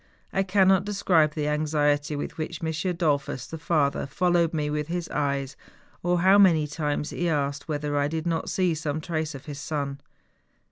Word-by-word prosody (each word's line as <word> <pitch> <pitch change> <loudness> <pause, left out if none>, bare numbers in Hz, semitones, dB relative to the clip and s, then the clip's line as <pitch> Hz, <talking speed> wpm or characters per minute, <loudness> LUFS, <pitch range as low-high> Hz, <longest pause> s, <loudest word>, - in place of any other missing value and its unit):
I 195 - +2
cannot 190 0 +4
describe 180 -7 +2
the 150 -2 -1
anxiety 150 -1 +1
with 145 - -5
which 165 +1 -4
M. 160 - 0 0.2
Dollfus, 145 -6 0
the 160 - -7
father, 150 -4 +1
followed 175 +1 +2
me 150 -2 -1
with 150 0 -2
his 175 0 -3
eyes, 140 -2 -1 0.5
or 175 0 +1
how 190 +2 +6
many 165 -6 +5
times 150 0 -2
he 175 0 -1
asked 145 -2 -1
whether 150 -1 -2
I 145 0 +2
did 160 +2 -3
not 165 -1 -1
see 180 -3 +1
some 155 -1 -3
trace 155 -2 -3
of 135 - -10
his 145 -2 -7
son. 140 -2 -3
155 Hz, 180 wpm, -26 LUFS, 145-170 Hz, 0.5 s, how